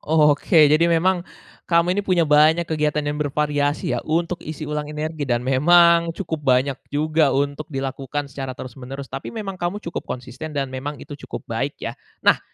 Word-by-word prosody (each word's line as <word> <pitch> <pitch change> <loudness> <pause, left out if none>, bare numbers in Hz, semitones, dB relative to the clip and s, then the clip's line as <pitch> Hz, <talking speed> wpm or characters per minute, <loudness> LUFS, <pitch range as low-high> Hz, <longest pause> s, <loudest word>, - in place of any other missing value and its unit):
Oke, 150 +1 +4
jadi 165 +3 +4
memang, 175 +2 +2 0.5
kamu 170 +1 +3
ini - - +1
punya 180 -4 +2
banyak 155 +3 +4
kegiatan 150 -1 -1
yang 150 +1 -2
bervariasi 145 0 0
ya, - - -1
untuk 170 +2 -1
isi 155 0 -6
ulang 150 0 -3
energi, 150 -1 -4
dan 120 0 0
memang, 170 +5 +5
cukup 160 -5 -4
banyak 135 0 +2
juga 155 +1 +2
untuk 145 +3 -2
dilakukan 135 0 -4
secara 135 -1 -6
terus-menerus. 130 +2 -8
Tapi 135 - -5
memang 195 -5 -6
kamu 175 +3 -1
cukup 170 - -5
konsisten, 130 +5 -6
dan 135 -2 -2
memang 140 +3 -5
itu 145 - -11 0.2
cukup - - -6
baik, - - -3
ya. - - -3 0.3
Nah, - - +5
150 Hz, 170 wpm, -22 LUFS, 140-165 Hz, 0.5 s, memang